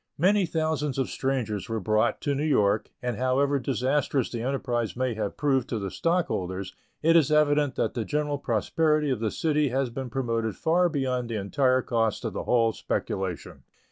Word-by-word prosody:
Many 190 +3 +3
thousands 155 -4 -1
of 135 - -1
strangers 120 -7 -2
were 115 0 -1
brought 110 +4 +1
to 145 - 0
New 140 +2 -1
York, 105 -9 +2
and 125 -3 -2
however 135 +3 +2
disastrous 135 0 0
the 115 - -3
enterprise 120 -5 -2
may 130 -1 0
have 105 -2 -4
proved 135 -4 +1
to 115 - -1
the 100 -3 -4
stockholders, 95 - -1 0.3
it 165 +1 +5
is 155 -4 +4
evident 150 -2 +3
that - - 0
the 120 - -2
general 145 +2 -1
prosperity 150 +6 +1
of 125 - -1
the 110 -1 0
city 150 +2 +1
has 130 0 -1
been 130 +1 -5
promoted 115 -4 -1
far 175 +2 +2
beyond 130 -5 -1
the 115 - -3
entire 130 +5 +1
cost 115 -3 0
of - - -2
the - - -4
whole 115 -2 +3
speculation. 95 -3 -4
130 Hz, 180 wpm, -26 LUFS, 115-150 Hz, 0.3 s, it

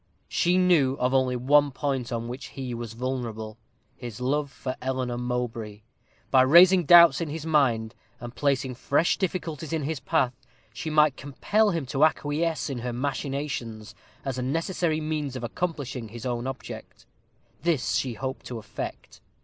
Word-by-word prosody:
She 175 +1 +2
knew 165 -8 +4
of 125 -1 0
only 130 -1 +2
one 145 +4 +4
point 135 -2 -2
on 115 -1 -3
which 125 +3 -6
he 130 -2 -6
was 115 -1 -6
vulnerable 115 -3 -4 0.4
his 120 -2 -8
love 140 +3 0
for 130 -1 -5
Eleanor 130 -2 -2
Mowbray. 120 -4 -3 0.5
By 130 - +6
raising 175 +6 +7
doubts 170 +2 +8
in 165 - -2
his 155 +1 -5
mind, 120 -8 +2 0.3
and 120 0 -8
placing 135 -2 0
fresh 140 +6 +1
difficulties 165 -5 -3
in 160 -2 -1
his 155 0 -2
path, 145 -6 +1 0.4
she 130 +7 -5
might 150 -2 +4
compel 205 +10 +1
him 165 -7 -1
to 135 +3 0
acquiesce 155 +1 +1
in 135 -4 -4
her 125 +1 -3
machinations, 135 -4 -4 0.3
as 130 -2 -2
a - - -1
necessary 165 +4 -1
means 155 -3 -3
of 125 - -5
accomplishing 135 -4 -3
his 115 +2 -9
own 120 0 -2
object. 135 -1 -8 0.6
This 165 -7 0
she 125 -4 -1
hoped 130 +3 -5
to 120 - -5
effect. 110 -2 -7
135 Hz, 160 wpm, -26 LUFS, 125-155 Hz, 0.6 s, doubts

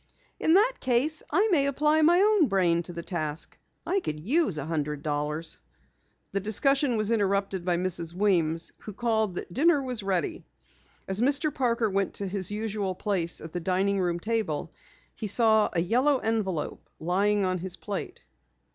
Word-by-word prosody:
"In 320 - +3
that 455 +6 +3
case, 265 +5 +1
I 395 +8 +3
may 280 -5 +3
apply 300 +3 +2
my 340 +3 +5
own 415 -6 +4
brain 180 -5 +2
to 175 - -9
the 170 -1 -6
task. 155 -3 -3 0.3
I 395 - +1
could 155 - -4
use 240 - +1
a 140 - -3
hundred 150 -2 -3
dollars." 150 +2 -3 0.7
The 195 - 0
discussion 255 +5 +2
was 215 +1 0
interrupted 200 -3 0
by 175 -1 +1
Mrs. 175 -2 -2
Weems 170 -4 +1
who 210 - -9
called 220 -3 0
that 180 - -6
dinner 310 - +4
was 250 -4 -3
ready. 190 -5 -2 0.6
As 190 +3 -1
Mr. 285 +3 +1
Parker 235 -3 +1
went 195 -1 -1
to 200 - -3
his 190 -1 +1
usual 205 -2 -3
place 180 -5 -1
at 160 0 -9
the 175 - -2
dining 190 +3 0
room 175 -2 0
table, 200 -8 -2 0.4
he 215 - -5
saw 220 0 +3
a 175 - 0
yellow 255 - +2
envelope 215 -9 -2
lying 200 +4 +1
on 185 -1 -1
his 185 +1 -4
plate. 205 -2 -6
200 Hz, 170 wpm, -27 LUFS, 175-245 Hz, 0.7 s, my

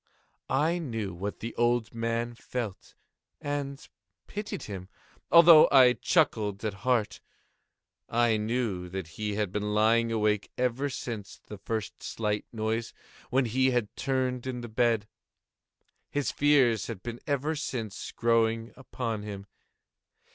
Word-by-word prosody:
I 155 +6 +2
knew 115 - -4
what 100 +4 -5
the 115 - -4
old 120 -1 +1
man 115 +1 -2
felt, 120 -4 -6 0.4
and 145 -1 -4 0.4
pitied 210 0 -5
him, 95 -2 -7 0.4
although 170 -2 +9
I 130 -3 +7
chuckled 110 - +1
at 105 - -1
heart. 115 0 0 0.9
I 120 -1 +3
knew 105 -5 -2
that 95 -3 -5
he 105 +4 -3
had 105 -3 -1
been 105 +1 -2
lying 115 +2 +3
awake 105 -2 +1
ever 125 +3 0
since 110 -6 -6
the 105 - -9
first 110 0 -4
slight 105 -2 -2
noise, 110 0 -2 0.3
when 130 0 +2
he 130 +3 +2
had 120 -5 -1
turned 130 -2 -1
in 125 -2 -3
the 120 - -6
bed. 115 -2 +1 1.0
His 145 -1 -1
fears 135 -7 +3
had 110 -5 -7
been 120 0 -5
ever 145 +2 0
since 115 -8 -4
growing 115 0 +1
upon 115 -4 -4
him. 100 -1 -7
115 Hz, 135 wpm, -28 LUFS, 105-130 Hz, 1.0 s, although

